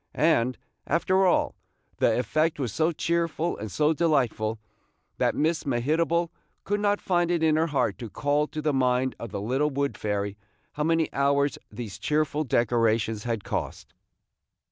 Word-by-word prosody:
And, 130 -6 +2 0.3
after 185 +4 +2
all, 180 - +2 0.4
the 115 - +2
effect 155 +5 0
was 125 -7 -2
so 160 +1 +2
cheerful 170 0 -1
and 105 -1 -7
so 150 - +2
delightful, 125 -9 +1 0.6
that - - +2
Miss 160 +2 +1
Mehitable 160 +6 +1 0.3
could 205 +1 -1
not 205 0 +1
find 175 -2 +1
it 170 -2 +1
in 155 -1 +4
her 160 +1 +2
heart 145 -3 0
to 115 -3 -6
call 145 +6 0
to 155 0 -6
the 150 -1 +1
mind 130 0 +1
of 115 - -6
the 100 0 -4
little 130 +8 0
wood 140 0 -1
fairy 100 -1 -2 0.3
how 150 - -2
many 165 -1 +1
hours 140 +1 +1
these 105 -2 -7
cheerful 150 +5 0
decorations 115 -3 +1
had 115 -4 -2
cost. - - -5
145 Hz, 160 wpm, -26 LUFS, 120-160 Hz, 0.6 s, in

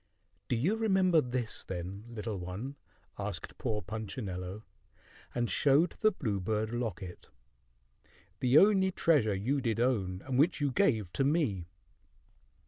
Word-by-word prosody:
"Do 125 - +1
you 170 - +1
remember 190 -6 +3
this, 125 -3 -3
then, 95 +3 -6
little 110 -3 -4
one?" 95 +10 -5 0.4
asked - - -5
poor 105 -1 -2
Punchinello, 105 -3 -5 0.7
and 120 -1 +1
showed 145 - +3
the 215 - +2
bluebird 110 - -2
locket, 105 -7 -5 1.1
"the 125 +2 +4
only 195 0 +6
treasure 140 - +3
you 130 +9 0
did 115 -3 -1
own, 100 -7 0
and 130 -1 -1
which 165 +5 +3
you 145 -2 +1
gave 110 - +1
to 135 - +1
me?" 135 - +1
120 Hz, 130 wpm, -31 LUFS, 100-145 Hz, 1.1 s, only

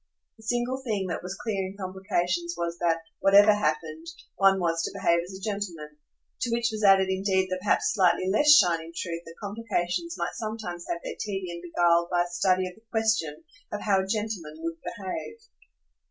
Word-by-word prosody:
The - - -17
single 245 +2 -1
thing 210 -6 -1
that 165 - -3
was 185 +1 -6
clear 205 -4 -2
in 195 +1 -10
complications 175 -2 -2
was 170 0 -3
that, 165 -1 +1 0.2
whatever 205 +2 +7
happened, 160 -4 -2 0.3
one 195 -1 +4
was 165 -2 +1
to - - -2
behave 170 0 +3
as 190 +1 -8
a 190 - -15
gentleman 170 -8 -5 0.4
to 240 - -1
which 235 0 +1
was 215 0 -4
added 195 -1 +6
indeed 190 0 +1
the 185 - -1
perhaps 205 - +2
slightly 185 -3 +3
less 295 +10 +5
shining 170 - +5
truth 170 -2 -3
that 165 - -10
complications 210 - -2
might - - -2
sometimes 215 -6 -5
have 170 - -2
their - - -6
tedium 185 -4 -4
beguiled 170 0 +2
by 175 -1 +2
a - - -6
study 185 +1 +1
of 180 - -8
the 220 - -22
question 220 -10 0 0.3
of 210 - -4
how 200 -2 +2
a 190 - -5
gentleman 210 -7 -3
would 165 0 -3
behave. 205 - -6
190 Hz, 185 wpm, -27 LUFS, 170-210 Hz, 0.4 s, whatever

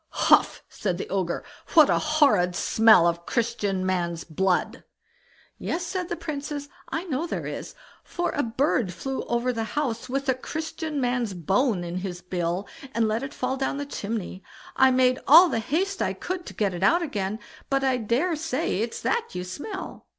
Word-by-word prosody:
"HUF!" - - +5
said 185 -4 -3
the - - -5
Ogre; 185 -3 -1 0.3
"what 310 -3 +9
a - - +2
horrid 280 - +3
smell 220 -5 +5
of 170 0 0
Christian 210 -5 -1
man's 175 -3 -1
blood!" 180 +3 0 0.8
"Yes!" 345 +2 -2
said 360 0 -3
the 345 - -1
Princess, 295 -3 -5 0.2
"I 325 - -2
know 325 -2 -2
there - - -4
is, - - -6 0.3
for 350 - -2
a - - 0
bird 235 -4 0
flew 270 +7 -4
over 240 +1 0
the 225 -1 -2
house 255 -4 -1
with 275 +2 -2
a 260 - +4
Christian 315 +3 -4
man's 245 -5 0
bone 190 - +1
in 175 +1 -4
his 180 -1 -5
bill, 180 +1 -2 0.3
and 230 -1 +2
let 215 +1 0
it 270 +1 -5
fall 255 +1 -2
down 270 +1 -1
the 285 - -3
chimney. 210 -7 -4 0.3
I 265 0 +6
made 255 0 +3
all 340 +5 +9
the 225 - 0
haste 375 - -1
I - - +1
could 360 -1 -5
to - - -9
get 200 -3 0
it 175 - -5
out 340 - +4
again, 205 - -2 0.3
but 275 0 +1
I 260 -1 +2
dare 250 +10 0
say 310 - -1
it's 230 0 -3
that 465 0 -1
you 180 - -3
smell." 330 - -7
250 Hz, 185 wpm, -25 LUFS, 190-300 Hz, 0.8 s, what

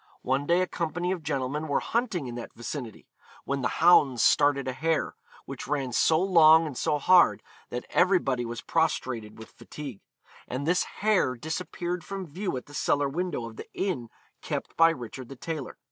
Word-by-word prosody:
One 135 +3 0
day 175 +2 +3
a - - +2
company 175 +1 -2
of 185 -3 -2
gentlemen 145 +1 -2
were 145 - +1
hunting 220 - -1
in 120 - -6
that 120 0 -8
vicinity, 120 -1 -7 0.4
when 140 0 -2
the 125 - +1 0.2
hounds 140 -9 +6
started 145 -2 +3
a 130 - -1
hare, 160 +4 0 0.3
which - - -7
ran 135 -3 -1
so 160 +6 +3
long 165 -3 +6
and 150 -4 -6
so 150 - 0
hard 180 +4 +5 0.3
that 125 0 -5
everybody 175 -9 +2
was 120 -1 -5
prostrated 130 -9 -1
with 110 - -12
fatigue; 140 -9 -9 0.5
and 130 +3 -4
this 175 +3 +2
hare 200 -11 +1
disappeared 175 +5 -4
from 195 -1 -6
view 180 -1 -4
at 125 - -7
the 145 - -15
cellar 145 0 +1
window 170 -5 -3
of 115 -1 -10
the - - -10
inn 160 - -2 0.3
kept - - -4
by 165 0 +6
Richard 125 -4 -6
the 135 - -8
Tailor. 155 +1 -6
145 Hz, 180 wpm, -27 LUFS, 130-175 Hz, 0.5 s, hounds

